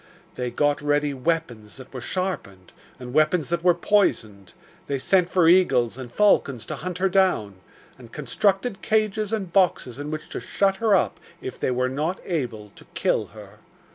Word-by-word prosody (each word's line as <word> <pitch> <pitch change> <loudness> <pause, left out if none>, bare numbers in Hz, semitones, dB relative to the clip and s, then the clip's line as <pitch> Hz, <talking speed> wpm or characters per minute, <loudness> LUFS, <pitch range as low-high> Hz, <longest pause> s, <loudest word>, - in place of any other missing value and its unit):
They 125 -1 -3
got 145 +4 +1
ready 145 0 +1
weapons 130 -7 -3
that 130 0 -13
were 130 - -6
sharpened, 120 - -4 0.3
and 125 -1 -8
weapons 155 +1 +2
that 170 0 -1
were 175 -1 +5
poisoned; 110 - 0 0.4
they 140 - -1
sent 180 +6 +2
for 180 -3 +3
eagles 135 -11 +4
and 125 -2 -8
falcons 135 - +2
to - - -5
hunt 180 +1 -5
her 190 +1 +2
down, 180 - +1 0.4
and 120 -3 -14
constructed 195 - -1
cages 215 -1 0
and 195 -6 -3
boxes 170 -9 +1
in 145 +1 -5
which 155 0 -5
to - - -5
shut 195 -1 0
her 220 -1 +3
up - - 0 0.2
if 130 - -7
they - - 0
were 125 0 0
not 150 +8 -2
able 120 - -4
to - - -15
kill - - 0
her. - - -14
155 Hz, 175 wpm, -24 LUFS, 125-190 Hz, 0.4 s, were